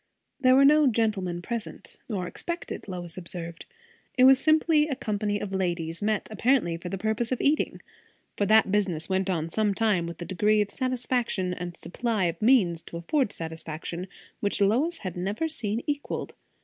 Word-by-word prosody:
There 255 -1 +5
were 275 +1 +6
no 300 0 +6
gentlemen 205 -7 0
present, 235 +2 -6
nor 195 -5 -2
expected, 340 - -5
Lois 175 -2 -5
observed. 170 -1 -6 0.5
It 255 - +5
was 265 0 +8
simply 310 0 +4
a 280 - -2
company 205 -2 -1
of 195 -1 -5
ladies, 170 -3 -2
met 215 0 0
apparently 220 -5 +2
for 170 +2 -6
the 195 - -3
purpose 220 +4 -1
of 255 - 0
eating; 295 +2 +1 0.5
for 205 - 0
that 220 -2 +5
business 185 -6 0
went 190 0 0
on 165 -3 0
for 165 - -11
some 210 -2 +1
time 205 -6 +1
with 170 - -8
a 175 - -5
degree 210 +4 +2
of 205 -1 0
satisfaction, 245 -7 -1
and 175 -1 -6
a - - -23
supply 225 +1 -2
of 170 0 -2
means 210 -9 +4
to 170 - -8
afford 250 - 0
satisfaction, 165 +2 -6 0.3
which 205 - 0
Lois 255 +12 +2
had 185 -4 -6
never 200 - -1
seen 230 -7 -3
equalled. 290 -1 -3
205 Hz, 180 wpm, -27 LUFS, 175-245 Hz, 0.5 s, was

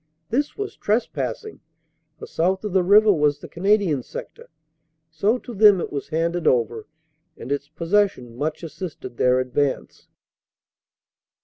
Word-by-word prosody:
This 285 +5 -1
was 410 -1 -5
trespassing, 245 - -2 0.6
for - - -8
south 185 +4 -1
of 210 -3 -4
the 190 - +4
river 205 +3 +6
was 150 -3 +2
the - - -11
Canadian 190 -5 +1
sector. - - -10 0.6
So 200 +9 +1
to 245 - -10
them 205 -2 +6
it - - -5
was 140 - -4
handed 165 +2 -1
over, 115 -1 +1 0.5
and 125 - -8
its 145 0 -2
pos 165 +2 -8
session 195 - +1
much 155 +6 -3
assisted 155 - -8
their 125 0 +3
advance. 130 +2 -2
170 Hz, 140 wpm, -23 LUFS, 145-205 Hz, 0.6 s, river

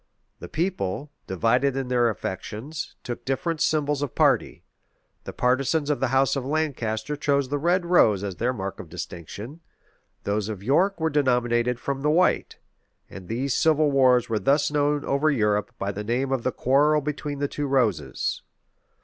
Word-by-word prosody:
The - - -8
people, 150 - -2 0.2
divided 125 +8 +1
in 135 -1 -2
their 120 -1 +2
affections, 110 - -5
took 120 - -6
different 155 +5 -2
symbols 150 -2 +1
of 145 -4 -3
party: - - +2 0.6
the - - -5
partisans 140 +4 +1
of 145 - -1
the 130 - +1
house 135 +2 +2
of 135 - -2
Lancaster 135 -4 -2
chose 140 -2 0
the 145 +1 -1
red 175 +4 +1
rose 110 - +4
as 95 -3 -4
their 120 +6 0
mark 100 -5 -5
of 85 - -9
distinction;[] 105 - -8 0.6
those 105 +1 -1
of 100 -3 -6
York 175 - +2
were 160 0 0
denominated 125 -3 +1
from 135 +1 -3
the 150 - +1
white; 180 +4 +2 0.5
and 95 -1 -10
these 125 +5 -1
civil 155 0 +3
wars 130 -3 +4
were 110 -2 -1
thus 140 +4 +2
known 145 0 +1
over 140 +3 +2
Europe 105 -7 +1
by 100 - -2
the 105 +1 -5
name 125 +5 -1
of 135 -2 0
the 130 - -1
quarrel 145 +5 +3
between 145 0 -4
the 145 0 -1
two 145 +1 -3
roses. 110 - 0
135 Hz, 170 wpm, -25 LUFS, 115-150 Hz, 0.6 s, rose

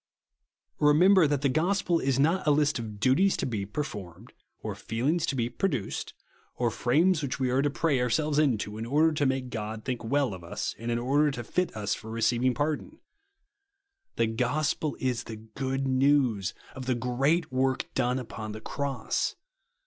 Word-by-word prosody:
Remember 165 +4 +6
that 145 -1 -1
the - - +4
gospel 170 +4 +1
is 135 -1 0
not 160 +5 +2
a - - +6
list 150 -2 +2
of 105 -3 -7
duties 150 - +3
to - - -1
be 105 -6 -3
performed, 105 - -6 0.3
or - - -3
feelings 145 +9 -1
to - - -1
be 120 -2 0
produced, 130 - -3 0.4
or 120 -2 0
frames 155 - +2
which 140 -1 -3
we 130 -2 +1
are 130 +2 +3
to 145 - +1
pray 145 -2 +1
ourselves 150 +5 +1
into, 110 -7 0
in 115 - -4
order 155 +5 +3
to 145 -2 +1
make 130 -1 -2
God 110 0 -5
think 125 -3 -3
well 135 0 +1
of 90 -2 -9
us, 85 - -4
and 115 +1 -4
in 115 - +1
order 140 +5 +2
to 130 -4 -4
fit 180 0 -1
us 105 -1 -1
for 110 - -7
receiv 115 +2 +1
ing 130 -1 +3
pardon. 155 - -2 1.2
The - - +2
gospel 135 +6 -1
is 125 -2 -1
the 110 - -6
good 130 +5 -3
news 130 -7 +2 0.2
of 130 -2 -8
the 130 - +2
great 135 +7 +1
work 130 0 +1
done 125 +1 +1
upon 110 -4 -6
the 110 - -7
cross. 140 0 -2
130 Hz, 180 wpm, -28 LUFS, 115-150 Hz, 1.2 s, Remember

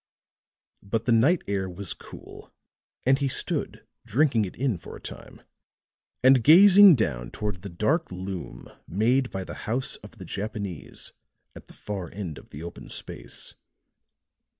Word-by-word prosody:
But 110 +3 -2
the 125 - +2
night 135 +10 +4
air 95 -2 -1
was 90 +1 -3
cool - - -13 0.5
and 135 +2 +4
he 140 - +1
stood 130 - -2 0.2
drinking 120 -3 +2
it 90 - -8
in 125 -8 -1
for - - -10
a - - -10
time, - - -11 0.8
and 130 -2 +6
gazing 195 - +9
down 65 - -1
toward 105 -5 -4
the 100 - -7
dark 140 - 0
loom 90 -8 -6 0.2
made 120 +7 +2
by 95 - -4
the - - -8 0.2
house 125 +4 -1
of 105 +3 -14
the 95 - -9
Japanese 100 -3 -5 0.4
at - - -12
the - - -15
far 95 -5 -6
end 85 -8 -6
of - - -19
the 75 +3 -9
open 85 - -9
space. - - -7
105 Hz, 150 wpm, -26 LUFS, 90-130 Hz, 0.8 s, gazing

